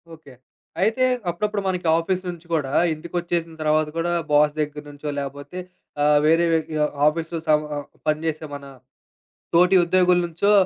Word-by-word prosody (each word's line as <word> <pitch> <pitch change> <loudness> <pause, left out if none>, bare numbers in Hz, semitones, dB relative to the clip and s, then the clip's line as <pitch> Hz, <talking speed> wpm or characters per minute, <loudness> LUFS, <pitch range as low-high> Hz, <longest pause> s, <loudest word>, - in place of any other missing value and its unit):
Okay. 155 -4 -16 0.5
అయితే 225 +6 +2 0.2
అప్పుడప్పుడు 210 +4 -2
మనకి 180 -3 -1
ఆఫీస్ 185 +2 -1
నుంచి 175 -1 -8
గూడా 145 -4 0 0.2
ఇంటికొచ్చేసిన 170 +1 -3
తర్వాత 155 0 +2
గూడా 170 +1 0 0.2
బాస్ 150 0 +4
దగ్గర 150 -1 -3
నుంచో 145 +1 -7
లేపోతే 140 +5 -7 0.4
ఆహ్, 150 0 +5
వేరే 165 +2 +4
వే 165 - +4 0.3
ఆహ్, 150 - 0
ఆఫీసులు 165 +2 0
సం 150 -1 +4
ఆహ్, 145 - -5 0.2
పని 155 0 +2
జేసేమనా 145 -3 -5 0.8
తోటి 180 +3 +5
ఉద్యోగుల 180 0 +3
నుంచో 175 +5 0
160 Hz, 145 wpm, -23 LUFS, 150-175 Hz, 0.8 s, ఆహ్